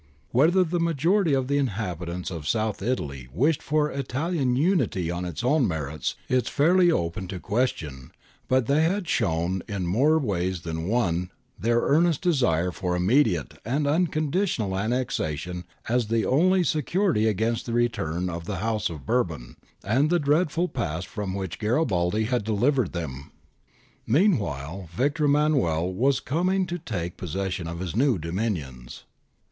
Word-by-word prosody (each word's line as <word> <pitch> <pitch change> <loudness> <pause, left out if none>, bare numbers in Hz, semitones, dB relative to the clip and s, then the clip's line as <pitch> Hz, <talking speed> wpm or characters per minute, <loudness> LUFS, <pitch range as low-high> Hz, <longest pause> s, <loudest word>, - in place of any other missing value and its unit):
Whether 165 +9 +4
the 175 0 -1
majority 165 +1 +2
of 130 -1 0
the 140 +1 +1
inhabitants 90 - -3
of 80 -4 -6
South 110 +1 0
Italy 70 - -3
wished 140 - +1
for 150 0 +1
Italian 140 0 -1
unity 130 - +1
on 85 +1 -3
its 90 +4 -5
own 130 0 +3
merits 75 -4 -3
is 130 -2 +1
fairly 175 +4 +4
open 90 - -2
to 95 0 -5
question, 80 - -2 0.4
but 130 -2 +2
they 140 +5 +3
had 180 +3 0
shown 90 - 0
in 100 -4 -3
more 135 - +3
ways 95 - -1
than 80 0 -4
one 90 -6 0 0.3
their 120 +1 +2
earnest 165 +3 +2
desire 90 - +2
for 90 0 -2
immediate 95 - +1
and 140 +7 0
unconditional 155 - 0
annexation 90 - -2 0.2
as 120 -1 +1
the 115 0 +1
only 180 +7 +3
security 155 - +1
against 110 +3 0
the 115 - -3
return 90 -8 0
of 85 -1 -5
the 105 - -3
House 110 0 -1
of 75 -6 -8
Bourbon 85 - -1 0.3
and 130 +9 +2
the 175 - +3
dreadful 160 +3 +1
past 85 - -3
from 100 -1 -4
which 95 -4 -4
Garibaldi 105 - +1
had 120 0 0
delivered 115 +2 +1
them. 70 -6 -5 0.8
Meanwhile, 100 - +1
Victor 145 - +1
Emmanuel 135 - +2
was 130 +7 +2
coming 185 +6 0
to 175 0 -4
take 90 - -4
possession 90 0 -3
of 85 0 -5
his 90 -1 -4
new 130 -2 +3
dominions. 80 - -4
110 Hz, 150 wpm, -25 LUFS, 90-145 Hz, 0.8 s, Whether